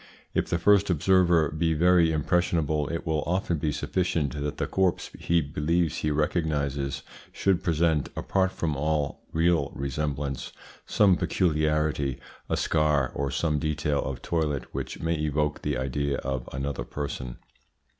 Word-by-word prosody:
If -, -, 0 dB
the 85 Hz, -, +1 dB
first 100 Hz, +3 st, +4 dB
observer 85 Hz, -2 st, +3 dB
be 80 Hz, +1 st, 0 dB
very 85 Hz, 0 st, +4 dB
impressionable, 80 Hz, -2 st, +1 dB
it 85 Hz, -, -4 dB
will 80 Hz, -2 st, 0 dB
often 85 Hz, -2 st, 0 dB
be 75 Hz, 0 st, 0 dB
sufficient 75 Hz, -1 st, -1 dB
that 75 Hz, 0 st, -3 dB
the -, -, -1 dB
corpse 95 Hz, -2 st, 0 dB
he 85 Hz, 0 st, +2 dB
believes 80 Hz, +3 st, 0 dB
he 75 Hz, -, -1 dB
recognises 75 Hz, -3 st, -1 dB, 0.3 s
should 95 Hz, -3 st, +1 dB
present 80 Hz, -3 st, +1 dB
apart 95 Hz, -1 st, 0 dB
from 80 Hz, -5 st, -2 dB
all 75 Hz, 0 st, -1 dB
real 80 Hz, -3 st, +2 dB
resemblance 70 Hz, 0 st, -3 dB, 0.3 s
some 100 Hz, -4 st, +4 dB
peculiarity, 75 Hz, -6 st, 0 dB, 0.3 s
a -, -, +1 dB
scar, 75 Hz, -4 st, +2 dB
or 70 Hz, 0 st, -2 dB
some 75 Hz, -1 st, 0 dB
detail 75 Hz, -1 st, 0 dB
of 65 Hz, -2 st, -5 dB
toilet 75 Hz, -6 st, -1 dB
which -, -, -5 dB
may 80 Hz, +1 st, 0 dB
evoke 75 Hz, 0 st, -1 dB
the -, -, -1 dB
idea 70 Hz, +2 st, -1 dB
of 65 Hz, -2 st, -4 dB
another 70 Hz, -1 st, -3 dB
person. 65 Hz, -2 st, -5 dB
75 Hz, 145 wpm, -27 LUFS, 70-85 Hz, 0.3 s, first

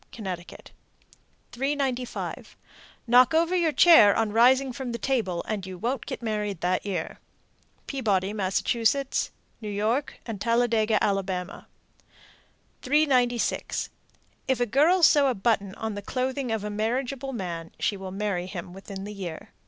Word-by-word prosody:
Connecticut. 185 Hz, -6 st, -7 dB, 0.8 s
395. 265 Hz, -1 st, -3 dB, 0.5 s
Knock 250 Hz, +4 st, +5 dB
over 335 Hz, +3 st, +2 dB
your 340 Hz, -3 st, +2 dB
chair 285 Hz, -11 st, +7 dB
on 225 Hz, -2 st, 0 dB
rising 255 Hz, +3 st, +4 dB
from 255 Hz, -2 st, -5 dB
the -, -, -2 dB
table, 215 Hz, -9 st, -1 dB
and 210 Hz, -3 st, -3 dB
you 185 Hz, -1 st, -7 dB
won't 240 Hz, +5 st, -3 dB
get -, -, -6 dB
married 210 Hz, -5 st, -2 dB
that 180 Hz, +1 st, 0 dB
year. 180 Hz, -5 st, -4 dB, 0.7 s
Peabody, 205 Hz, -7 st, 0 dB
Mass., 195 Hz, -3 st, -1 dB, 1.0 s
New 215 Hz, -, -5 dB
York, 220 Hz, +7 st, -1 dB
and 220 Hz, -5 st, -6 dB
Talladega, 230 Hz, -2 st, +2 dB
Ala. 190 Hz, -2 st, -3 dB, 1.1 s
396. 255 Hz, -4 st, +1 dB, 0.6 s
If 260 Hz, -2 st, +1 dB
a 245 Hz, -, +2 dB
girl 310 Hz, -, +3 dB
sew 290 Hz, -3 st, +6 dB
a 255 Hz, -, +1 dB
button 200 Hz, -2 st, 0 dB
on 220 Hz, -1 st, -4 dB
the 205 Hz, -, -5 dB
clothing 255 Hz, +3 st, -2 dB
of 220 Hz, -2 st, -2 dB
a 210 Hz, -, -4 dB
marriageable 250 Hz, +5 st, -2 dB
man, 170 Hz, -8 st, -5 dB
she 205 Hz, -, 0 dB
will 190 Hz, -1 st, -7 dB
marry 190 Hz, -2 st, -2 dB
him 180 Hz, -1 st, -7 dB
within 195 Hz, 0 st, -8 dB
the 210 Hz, +1 st, -7 dB
year. 180 Hz, -5 st, -7 dB
220 Hz, 140 wpm, -26 LUFS, 195-260 Hz, 1.1 s, chair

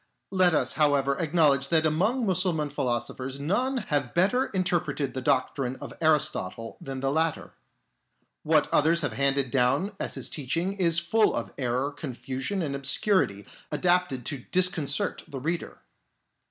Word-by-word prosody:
Let 185 Hz, -3 st, +3 dB
us, -, -, +1 dB
however, 140 Hz, -2 st, +2 dB
acknowledge 150 Hz, -5 st, +3 dB
that 160 Hz, 0 st, +2 dB
among 210 Hz, +11 st, +1 dB
Mussulman 175 Hz, -6 st, 0 dB
philosophers 130 Hz, 0 st, -2 dB
none 245 Hz, -, 0 dB
have 145 Hz, -, -2 dB
better 225 Hz, +10 st, +3 dB
inter 185 Hz, -2 st, +1 dB
preted 140 Hz, -3 st, -4 dB
the 130 Hz, -, -4 dB
doctrine 130 Hz, -1 st, 0 dB
of -, -, -9 dB
Aristotle 150 Hz, -, 0 dB
than 135 Hz, -1 st, -6 dB
the 135 Hz, 0 st, 0 dB
latter. 155 Hz, -, -1 dB, 0.9 s
What 155 Hz, -1 st, +3 dB
others 165 Hz, +3 st, +3 dB
have 145 Hz, -6 st, -2 dB
handed 140 Hz, +1 st, +1 dB
down 135 Hz, +9 st, +2 dB
as -, -, -3 dB
his -, -, -3 dB
teaching 165 Hz, +7 st, -2 dB
is 170 Hz, -4 st, +1 dB
full 210 Hz, +6 st, +2 dB
of -, -, -4 dB
error, 130 Hz, +2 st, -1 dB
confusion, 135 Hz, +5 st, -4 dB
and 140 Hz, -3 st, -3 dB
obscurity 140 Hz, -, +1 dB, 0.3 s
adapted 175 Hz, -9 st, +1 dB
to 145 Hz, -3 st, -3 dB
disconcert 180 Hz, -6 st, 0 dB
the 140 Hz, -4 st, -6 dB
reader. 165 Hz, +6 st, -3 dB
150 Hz, 145 wpm, -27 LUFS, 135-180 Hz, 0.9 s, Let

